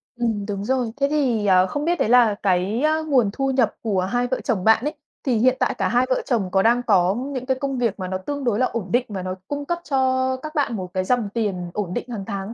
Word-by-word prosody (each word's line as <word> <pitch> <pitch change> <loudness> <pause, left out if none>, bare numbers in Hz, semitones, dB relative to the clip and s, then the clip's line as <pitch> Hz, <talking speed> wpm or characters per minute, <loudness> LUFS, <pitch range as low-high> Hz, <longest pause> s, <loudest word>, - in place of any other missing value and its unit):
Ừm, 225 -4 -1
đúng 200 -1 -4
rồi. 250 -1 0
Thế 280 0 +2
thì, 260 -8 +1
ờ, 185 -1 +5
không 290 +8 -3
biết 345 +1 +1
đấy - - +1
là 240 -4 +5
cái 195 +6 +1 0.2
nguồn 255 -8 +3
thu 270 +2 0
nhập 250 -5 +1
của 205 -5 0
hai 245 +7 0
vợ 255 +1 -2
chồng 215 -8 -1
bạn 225 +2 +4
ấy, 300 - -1 0.3
thì 250 -4 +1
hiện 255 +3 +3
tại - - +1
cả - - +1
hai 245 +1 +3
vợ 255 - +1
chồng 210 -8 -1
có 190 - +3
đang 235 +4 +3
có 190 -4 +3
những 260 0 -4
cái 260 0 0
công 275 -1 -2
việc 230 -5 -1
mà 185 - -3
nó 185 0 -2
tương 285 +9 -5
đối 235 -4 +1
là 255 - +3
ổn 230 -6 -4
định 245 +1 +2
và 195 -3 -4
nó 185 0 -3
cung 285 0 -4
cấp 345 +3 -2
cho 260 -2 +1
các 310 +1 -8
bạn 285 -6 0
một 185 -3 -6
cái 185 - 0
dòng 230 +1 0
tiền 190 -6 -2
ổn 195 -4 -3
định - - -3
hàng 220 -5 -5
tháng 200 0 -4
235 Hz, 270 wpm, -22 LUFS, 200-260 Hz, 0.3 s, ờ